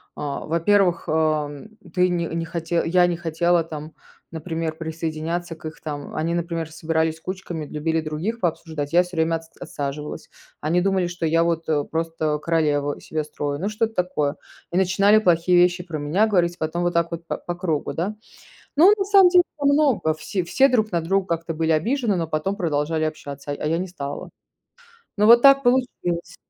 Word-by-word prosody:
э, - - -8
во-первых, 170 +5 +1
эм, 155 +5 -1 0.2
ты 180 -1 +3
не 175 -1 -1
не 165 0 -3
хоте 165 +1 -1
я 175 +1 +4
не 170 -1 -1
хотела 170 0 +1
там, 155 -1 -7 0.4
например, 160 0 -4
присоединяться 165 +1 -4
к 160 - -15
их 155 +1 -7
там. 145 -2 -6
Они, 165 +2 -1
например, 165 -2 -3
собирались 160 0 -1
кучками, 175 -3 -5
любили 160 +2 -1
других 160 +9 -3
пообсуждать. 160 -4 -3
Я 175 - +6
всё 180 -1 -10
время 165 +1 +2
отс 165 0 -7
отсаживалась. 145 +1 -6 0.3
Они 160 +4 +1
думали, 190 -2 +1
что 175 -1 -4
я 165 +1 +3
вот, 165 -1 -1
э, 150 -2 +1
просто 160 -1 -2
королеву 150 -3 0
из - - -13
себя 155 -1 -2
строю. 145 -1 -4
Ну, 195 - -2
что-то 220 +1 -1
такое. 155 -5 0 0.4
И 175 - -1
начинали 195 +3 +4
плохие 175 -3 +3
вещи 180 0 +3
про 165 -3 -5
меня 150 +9 +2
говорить, 175 -4 +1
потом 160 +3 -2
вот 175 0 0
так 170 0 +1
вот 170 0 -6
па - - -2
по 175 - -5
кругу, 170 -5 -2
да. 190 +6 -2 0.6
Но, 350 +7 +8
на 390 - +1
самом 390 -2 +6
деле, 355 0 +6 0.2
много 280 - +3
все 175 +4 -3
все 270 +10 +3
друг 220 -4 +1
на 170 - +1
друга 190 +3 0
как-то 165 0 -6
были 160 0 0
обижены, 225 - +1
но 170 -2 -1
потом 155 +6 -1
продолжали 155 -2 -1
общаться, 145 -2 -5
а - - -1
а 150 - 0
я 165 - +1
не 185 +2 -3
стала. 145 -5 -6 0.9
Ну 210 - +3
вот 235 +2 +8
так 275 +1 +7
получилось. 225 -9 0
165 Hz, 190 wpm, -23 LUFS, 155-185 Hz, 0.9 s, Но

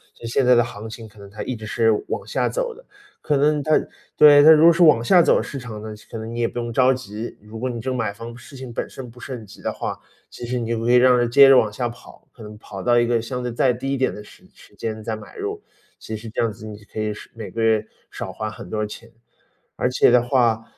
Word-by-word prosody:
所 - - -19
以 - - -4
现 125 +3 +1
在 125 0 +6
的 120 - +4
行 110 -2 -8
情 110 0 -10
可 105 - -19
能 100 0 -12
它 105 +2 -7
一 130 - -4
直 110 - -9
是 115 +1 +2 0.2
往 - - -4
下 - - -1
走 - - -2
的。 - - -17 0.4
可 150 - 0
能 150 +1 +2
它 155 - -2 0.4
对， 145 -1 +8
它 155 - +9
如 155 0 +6
果 170 - +9
是 170 +1 +3
往 150 -8 +5
下 180 +7 +6
走 - - +3
市 140 - -7
场 115 -4 -8
呢， 110 - -7 0.2
可 - - -5
能 110 +1 -6
你 120 - -5
也 115 - +2
不 120 - -5
用 120 0 -4
着 130 +2 +4
急。 115 -3 -7
如 105 +2 -10
果 130 +2 -2
你 120 -2 -5
这 130 - -4
个 130 - -2
买 110 -4 -2
房 115 +2 -9
事 125 - -14
情 130 -2 -8
本 - - -4
身 130 -2 -9
不 120 +1 -16
是 130 - -7
很 115 -3 -8
急 100 - -15
的 - - -2
话， - - -5 0.3
其 - - -9
实 125 +1 -2
你 115 - -4
就 115 -1 -1
可 115 +2 0
以 - - +6
让 125 0 +5
它 120 - +2
接 135 +4 +7
着 135 - +8
往 110 -3 +2
下 120 +1 -2
跑， 120 - -15
可 115 - -14
能 105 0 -10
跑 - - -9
到 120 -1 +4
一 120 - +3
个 120 -1 +2
相 125 +2 -5
对 125 - -3
再 125 +2 +2
低 135 +3 -4
一 - - -1
点 130 - 0
的 105 - -9
时 - - -18
时 - - -19
间 110 -1 -5
再 110 0 -3
买 110 - -13
入， 415 0 -4 0.4
其 110 - -6
实 110 +1 -8
这 110 - -6
样 115 -2 +1
子 110 0 -11
你 105 -1 -8
可 110 - -8
以 110 0 -1
是 - - -12
每 115 - -8
个 115 - -4
月 110 -1 +2 0.3
少 - - -6
花 110 - -5
很 105 - -10
多 110 -1 -2
钱。 115 +2 -11 0.6
而 125 - 0
且 125 - +4
的 125 0 +5
话， 120 -3 +1
120 Hz, 315 characters per minute, -22 LUFS, 110-130 Hz, 0.6 s, 它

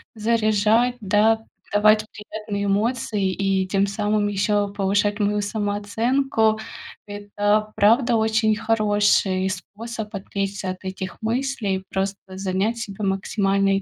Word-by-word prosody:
заряжать, 220 +2 +2
да, 215 +2 +3 0.3
давать 215 +1 +4
приятные 210 -1 -5
эмоции 205 -1 0
и 195 0 0
тем 195 +1 +1
самым 210 +1 0
ещё 205 +1 +1
повышать 205 +1 0
мою 210 0 +1
самооценку. 220 +3 0 0.5
Это, 205 +1 -1
правда, 235 +4 +4
очень 220 0 +2
хороший 205 -3 +2
способ 210 +3 -6
отвлечься 195 -1 -3
от 185 +1 -6
этих 190 +1 -6
мыслей, 225 -5 -1
просто 195 +1 -2 0.2
занять 195 +4 -1
себя 210 -2 -6
максимально. 195 0 +1
И 195 - -3
205 Hz, 115 wpm, -23 LUFS, 195-220 Hz, 0.5 s, давать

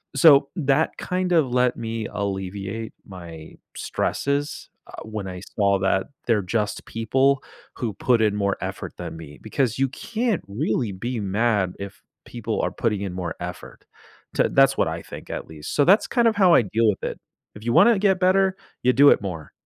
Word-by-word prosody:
So 140 -1 +6
that 150 -1 +1
kind 180 0 -2
of 145 -7 +3
let 125 0 +2
me 115 -1 -4
alleviate 100 +2 -4
my 85 -4 -11 0.2
stresses, 145 +1 -2 0.2
uh, - - -10
when 110 -3 -6
I 90 -1 -6 0.2
saw 100 -2 +3
that 95 0 0 0.2
they're 110 -3 +3
just 105 +2 -2
people 130 +5 +1 0.3
who 115 -5 -3
put 120 +1 +2
in 105 -1 +2
more 100 -1 0
effort - - -5
than - - -6
me 75 -3 -11
because 125 +2 -1
you 135 -1 +2
can't 225 - -2
really 115 0 -1
be 115 +5 -4
mad 100 -2 +1
if 100 0 -8 0.2
people - - -3
are - - -1
putting 105 -3 -1
in 95 -3 -4
more 90 -2 -4
effort 90 0 -8 0.5
to - - +2
that's 135 0 +4
what - - +2
I 80 +1 -4
think - - -10
at - - -5
least. 75 -1 -8
So 145 - +4
that's 195 +5 +5
kind 240 -2 +2
of 220 - +2
how 185 -4 +6
I - - +6
deal 110 +3 +1
with 95 - -2
it, - - -4 0.4
if 110 +2 -11
you 120 - +1
wanna 235 -3 +6
get 190 -2 +2
better, 190 +1 +3 0.3
you 125 0 +4
do 140 +3 +7
it - - +5
more. 85 -6 -6
115 Hz, 190 wpm, -23 LUFS, 100-140 Hz, 0.5 s, do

